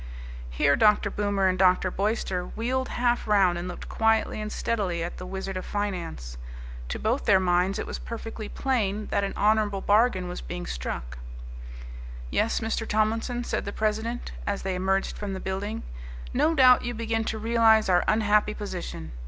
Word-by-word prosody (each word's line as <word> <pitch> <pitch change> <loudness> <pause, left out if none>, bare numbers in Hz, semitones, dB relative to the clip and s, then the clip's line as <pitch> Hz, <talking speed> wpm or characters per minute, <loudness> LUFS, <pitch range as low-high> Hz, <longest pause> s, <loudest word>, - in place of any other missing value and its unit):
Here 140 - +3
Dr. 210 +3 +3
Boomer 200 -2 +1
and 185 -1 0
Dr. 185 0 +4
Boyster 195 -3 -1
wheeled 260 +3 -1
half 240 -1 0
round 190 -4 +3
and 175 - -5
looked 180 - -7
quietly 225 -1 +1
and 215 0 -4
steadily 190 -7 -1
at 170 - -5
the 180 - -7
Wizard 190 0 -4
of 185 - -4
Finance. 170 - -4 0.5
To - - -3
both 235 +6 -1
their 195 -3 +5
minds 180 +1 +2
it - - -3
was - - -5
perfectly 225 -2 -6
plain 215 -6 -1
that 200 - +1
an 195 - -3
honourable 210 -1 +2
bargain 205 -3 +3
was 180 - -6
being 175 0 -6
struck. - - -5 1.1
"Yes, 230 - +1
Mr. 225 0 -2
Tomlinson," 225 +3 0
said - - -2
the 200 - -4
president, 220 +3 -2 0.2
as 200 -1 -2
they 190 0 -1
emerged 190 +1 -1
from 205 -2 -4
the 190 - -4
building, 200 +4 -4 0.5
"no 325 +1 +2
doubt 255 -3 +7
you 240 0 -3
begin 225 0 -1
to 220 - -2
realize 225 0 +4
our 180 -2 +4
unhappy 210 -1 +2
position. 180 - -6
205 Hz, 170 wpm, -26 LUFS, 185-225 Hz, 1.1 s, doubt